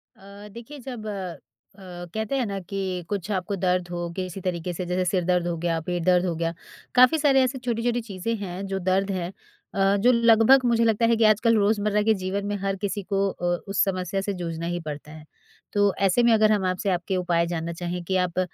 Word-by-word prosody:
अ, 200 +2 -13
देखिए 240 +5 -10
जब 245 -4 -7
अ, 190 0 -9 0.3
कहते 220 +4 -2
हैं 255 - 0
ना 200 -2 -3
कि 185 -1 -4
कुछ 200 -2 -3
आपको 195 +1 -2
दर्द 180 -1 0
हो 175 -1 -3
किसी 185 0 -5
तरीके 175 -1 -3
से, 180 +2 -4
जैसे 180 +1 0
सिर 180 0 +1
दर्द 180 -1 +1
हो 170 - -1
गया, 165 0 -1
पेट 175 +1 -3
दर्द 180 +1 +3
हो 175 -2 -1
गया। 165 0 -1 0.4
काफ़ी 255 +5 +6
सारे 275 -3 +4
ऐसे 255 +1 -1
छोटी-छोटी 240 0 -1
चीज़ें 220 +1 -4
हैं 195 -1 -5
जो 195 0 -2
दर्द 190 +2 +1
है 180 -2 -2 0.5
अ, 195 0 +3
जो 240 +5 +4
लगभग 235 +2 +5
मुझे 235 -1 +3
लगता 225 0 +2
है 230 0 +4
कि 225 - +2
आजकल 230 +2 +2
रोज़मर्रा 210 0 +2
के 220 +1 +4
जीवन 200 +2 -2
में 205 - -1
हर 195 0 -2
किसी 205 0 -2
को 195 +1 0
अ, 175 - -9 0.2
उस 195 -1 +2
समस्या 185 0 -2
से 200 +1 -2
जूझना 170 -2 -4
ही 175 +1 -2
पड़ता 150 0 -7
है। 155 -1 -12 0.5
तो 205 -1 +3
ऐसे 215 +6 +3
में 235 -1 +5
अगर 215 -1 +4
हम 205 -3 +1
आपसे 185 +2 -1
आपके 180 +1 -1
उपाय 170 -2 +1
जानना 170 -1 -3
चाहें 175 +1 -4
कि 190 +2 -2
आप 180 -1 0
195 Hz, 220 wpm, -25 LUFS, 180-215 Hz, 0.5 s, काफ़ी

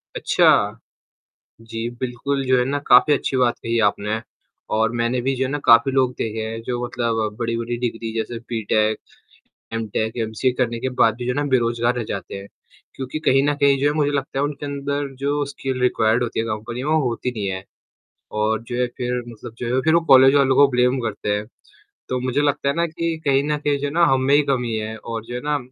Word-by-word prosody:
अच्छा। - - +3 0.8
जी 115 +1 -5
बिल्कुल, 130 +2 -2
जो 130 0 +3
है 125 - +3
ना 140 +2 -1
काफ़ी 150 - +6
अच्छी 135 -1 -1
बात 120 -2 +2
कही 115 0 -2
आपने 105 +2 -2 0.5
और 110 +1 +2
मैंने 120 +2 +1
भी 135 +2 0
जो 130 - -1
है - - -3
ना 145 - -1
काफ़ी 115 +3 +6
लोग 130 -1 +2
देखे 110 0 -3
हैं 115 +1 -5
जो 120 0 -3
मतलब 115 -3 -2
बड़ी-बड़ी 115 0 -2
डिग्री 115 -2 -3
जैसे 115 +1 -3
बीटेक, 110 -1 +1 0.8
एमटेक, 110 0 -2
एमसीए 115 +3 0
करने 120 -2 0
के 130 +2 -2
बाद 110 - +4
भी 120 - -5
जो 125 - 0
है - - -4
ना 145 - 0
बेरोज़गार 120 -1 +1
रह 120 - -2
जाते 100 -1 -5
हैं 100 0 -8 0.5
क्योंकि 130 +3 -5
कहीं 135 +1 +5
न - - +1
कहीं 140 -1 +5
जो 145 - +3
है 145 - +1
मुझे 145 -2 +1
लगता 135 -1 -2
है 140 - +2
उनके 145 0 -5
अंदर 140 0 -3
जो 145 +1 0
स्किल 135 -2 -4
रिक्वायर्ड 120 -1 +2
होती 120 - -3
है 115 - 0
कंपनी 115 +3 -4
में 150 +2 0
होती 125 -4 0
नहीं 105 -4 -4
है 95 0 -4 0.8
और 110 +1 0
जो 120 +1 -6
है 125 - +2
फिर 125 0 -2
मतलब 115 0 -10
जो 120 0 -2
है 130 - +3
फिर 160 +2 +3
वो 170 - +5
कॉलेज 135 +1 +8
वालों 135 -2 +4
को 140 - +7
ब्लेम 125 +1 +2
करते 110 -3 -3
हैं, 105 +1 -5 0.6
तो 125 0 -1
मुझे 130 +2 0
लगता 145 -1 0
है 140 - +1
ना 170 +1 +1
कि 165 0 -3
कहीं 135 -1 +3
न 150 0 0
कहीं 145 -1 0
जो 140 - -2
है 140 - -4
ना 170 - +5
हम 130 - +3
में 140 +2 +3
ही 150 - +5
कमी 125 -4 0
है 110 +1 -4
और 115 -1 -6
जो 120 - -8
है 125 - -3
ना 150 0 +1
125 Hz, 225 wpm, -21 LUFS, 115-140 Hz, 0.8 s, कॉलेज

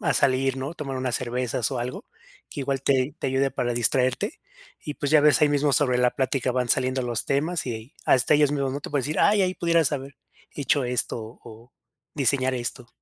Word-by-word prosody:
a - - +1
salir, 135 -1 +2
¿no? 135 +5 -5
Tomar 135 -4 -5
unas 130 -2 -1
cervezas 125 -2 -2
o 130 - -3
algo 125 +1 -5 0.5
que - - -6
igual 135 -1 -2
te 135 0 +1
te - - -3
ayude 135 +1 +1
para 120 -2 -2
distraerte 125 +2 0 0.4
y, 150 - -5
pues 145 -1 -3
ya 155 -1 +6
ves, 150 0 +4
ahí 150 - +5
mismo 145 0 +1
sobre 125 -2 +2
la 125 0 +3
plática 130 -1 0
van 125 -1 -1
saliendo 130 +2 +1
los 120 -3 -2
temas 155 +5 -1
y 120 - -2
ahí 110 +4 -10
hasta 130 +3 +4
ellos 145 -1 +4
mismos, 140 -2 -1
¿no?, 140 - -4
te - - -8
pueden 145 -2 0
decir: 150 +4 -3
"Ay, 205 -1 +4
ahí 185 0 0
pudieras 170 -4 +2
haber 140 -1 -5 0.4
hecho 145 -1 0
esto 125 -1 -1 0.3
o 115 +2 -14 0.4
diseñar 130 -1 +1
esto". 125 0 -5
135 Hz, 210 wpm, -25 LUFS, 125-145 Hz, 0.5 s, ya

